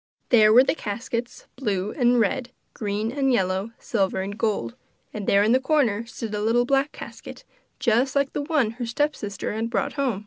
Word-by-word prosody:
There 215 -3 +6
were 245 +4 +8
the - - +1
caskets, 235 -1 -5
blue 205 -6 -2
and 245 -2 +3
red, 250 +3 0 0.2
green 210 +1 -2
and 270 0 +1
yellow, 190 -2 0
silver 195 -4 -1
and 200 +2 -5
gold; 205 - -1 0.4
and 210 -2 -5
there 200 0 +4
in 215 - +3
the 255 - +5
corner 255 -6 +1
stood 225 -2 -6
a 210 - -2
little 235 +3 +2
black 275 +2 +1
casket - - -10 0.3
just 250 +3 +1
like 280 -1 +1
the - - -1
one 285 -7 +1
her 240 +1 -5
stepsister 230 -7 -2
had 225 +2 -2
brought 205 -5 -1
home. 265 -8 -1
230 Hz, 185 wpm, -24 LUFS, 205-260 Hz, 0.4 s, were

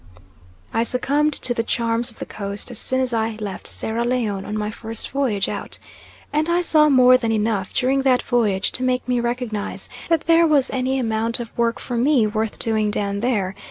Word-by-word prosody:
I 225 - +1
succumbed 285 +5 +2
to 250 - -2
the 230 - 0
charm 230 0 0
of 240 -2 -2
the - - -6
Coast 200 +3 -5
as 235 - +4
soon 260 0 +2
as 255 -2 0
I 220 -1 -1
left 205 -3 -6
Sierra 225 +2 -2
Leone 230 -6 -1
on 210 +1 -4
my 210 0 -2
first 225 +1 -5
voyage 245 -8 0
out, - - -5 0.6
and 305 +2 +1
I 345 +1 +2
saw 305 -3 +5
more 255 -2 +6
than 230 -2 -1
enough 210 -3 -1
during 265 +1 +1
that 255 -2 +2
voyage 215 -6 +1
to - - -4
make 255 0 0
me 250 -1 +1
recognise 235 -3 -3 0.2
that 330 -2 +3
there 330 0 +4
was 290 -4 +3
any 260 +1 -1
amount 230 -1 -1
of 235 -2 -8
work 235 0 0
for 245 - -4
me 255 -1 +3
worth 215 0 -2
doing 220 -2 0
down 200 -1 -2
there. 205 -5 0
235 Hz, 200 wpm, -21 LUFS, 215-260 Hz, 0.6 s, more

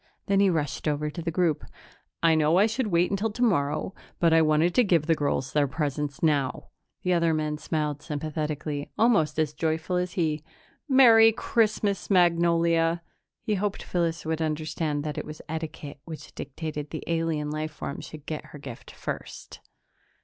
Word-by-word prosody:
Then 195 -1 +2
he 200 -1 +5
rushed 150 -6 -2
over 150 0 0
to 170 - -6
the 165 - -2
group. 165 -2 +1 0.6
"I 165 -1 +6
know 155 +2 +3
I 200 - +6
should 225 +2 -1
wait 175 -1 +2
until 200 +3 0
tomorrow, 180 -9 0 0.3
but 165 -1 +4
I 165 - +6
want 155 +2 +3
to 250 - +5
give 170 -7 +2
the 165 - +3
girls 140 -4 -1
their 145 -1 +3
presents 145 0 -3
now." 145 -5 +1 0.3
The 180 - +2
other 170 -2 +2
men 150 -1 -2
smiled 150 -3 -2
sympathetically, 150 -1 -3
almost 165 - +3
as 155 -2 +1
joyful 160 +3 -1
as 180 0 -2
he. 155 -4 -1 0.5
"Merry 230 -4 +7
Christmas, 215 -3 0
Magnolia!" 170 -2 +3 0.4
He 215 - 0
hoped 200 0 -2
Phyllis 170 -2 -1
would 160 0 -1
understand 155 -1 -2
that 150 -1 -3
it - - -4
was 155 0 -8
etiquette 155 -2 -6
which 160 -2 -9
dictated 150 +1 -5
that - - -38
the 155 - -6
alien 165 -3 -1
life 155 +1 -3
form 140 - -6
should 155 -2 -10
get 155 -1 -5
her - - -11
gift 135 -5 -10
first. - - -7
160 Hz, 170 wpm, -26 LUFS, 150-175 Hz, 0.6 s, Merry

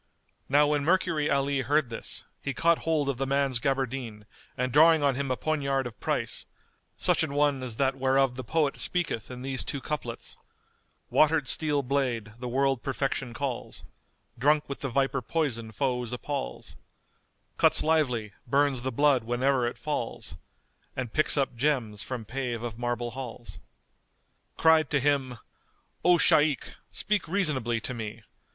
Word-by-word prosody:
Now 145 +2 +5
when 145 -1 +1
Mercury 170 -2 +1
Ali 140 0 +1
heard 140 -1 +1
this, 115 - -3 0.2
he 140 - -3
caught 170 0 +3
hold 155 -3 0
of 140 -3 -1
the 135 - -1
man's 135 -2 +2
gaberdine 130 -5 -2 0.3
and 125 0 -1
drawing 160 0 +6
on 140 -1 +3
him 140 +1 -3
a 130 - 0
poignard 140 -1 0
of 120 -3 -8
price, - - -2 0.5
such - - +2
an 140 - -1
one 145 -2 +2
as 125 -3 -4
that 135 +2 +1
whereof 135 -1 +2
the 130 +1 -6
poet 155 -2 0
speaketh 175 -10 -1
in 125 0 -8
these 135 -1 -2
two 140 - -3
couplets, 125 -5 -5 0.7
"Watered 155 -2 +3
steel 150 -3 +2
blade, 125 -5 -1
the 125 - -5
world 135 0 +1
perfection 135 -2 -2
calls, 130 -1 -4 0.3
* - - -30
Drunk 150 +4 +3
with 140 - -5
the 135 - -3
viper 135 +1 0
poison 120 -5 -2
foes 125 0 -1
appals, 125 - -5 0.8
Cuts - - +4
lively, 125 -9 +1
burns 140 0 +2
the 130 +1 -2
blood 140 +1 +3
whene'er 125 +1 +1
it 120 - -5
falls; 120 - -4 0.3
* - - -39
And 125 -3 -4
picks 155 - +4
up 135 -3 0
gems 115 -6 0
from 120 -2 -5
pave 120 -1 -3
of 115 -1 -5
marble 120 0 -2
halls;"[FN#217] 125 -2 -13
cried 160 -1 +4
to 145 - +2
him, 135 -3 0 0.7
"O 175 0 +6
Shaykh, 150 -3 +3 0.2
speak 205 -4 -1
reasonably 145 - +1
to 125 - -3
me! 110 -1 -6
135 Hz, 160 wpm, -28 LUFS, 120-145 Hz, 0.8 s, drawing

